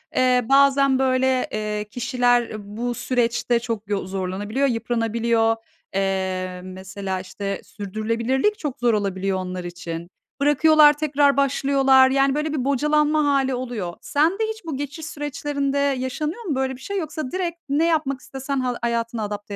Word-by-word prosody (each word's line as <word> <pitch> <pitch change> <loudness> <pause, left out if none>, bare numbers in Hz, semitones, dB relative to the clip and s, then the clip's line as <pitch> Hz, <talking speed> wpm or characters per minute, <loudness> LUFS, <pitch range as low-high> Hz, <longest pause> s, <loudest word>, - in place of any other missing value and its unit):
Eee, 250 -1 +3
bazen 275 -1 +5
böyle, 260 -1 +2
eee, 210 0 -2
kişiler 245 -1 +1 0.3
bu 240 +1 -1
süreçte 240 0 0
çok 225 -3 -5
yo 200 -2 -1
zorlanabiliyor, 195 +7 -1
yıpranabiliyor. 230 -1 +1 0.4
Eee, 190 -1 -1
mesela, 190 +1 -5
işte 195 +1 -5
sürdürülebilirlik 230 - -1
çok 290 -6 -4
zor 240 -1 +3
olabiliyor 195 -2 -1
onlar 185 -1 -4
için. 170 -1 -6 0.3
Bırakıyorlar, 295 +1 +6
tekrar 285 -2 +2
başlıyorlar. 270 -1 +4
Yani, 275 +1 +2
böyle 300 0 -1
bir 265 -4 -1
bocalanma 300 +2 +2
hâli 275 -2 +2
oluyor. 240 -8 -4
Sende 330 +9 +1
hiç 440 -4 -11
bu 310 -5 -4
geçiş 290 +3 -5
süreçlerinde 290 -2 -3
yaşanıyor 280 - -1
mu 330 -10 -2
böyle 265 0 -1
bir 255 - -15
şey? 400 - -4
Yoksa 310 -5 -5
direkt 355 -2 -2
ne 295 +4 +2
yapmak 305 -5 0
istesen 270 0 -4
hal 250 -1 -1
hayatına 230 -1 -1
adapte 205 0 -5
255 Hz, 145 wpm, -23 LUFS, 210-285 Hz, 0.4 s, Bırakıyorlar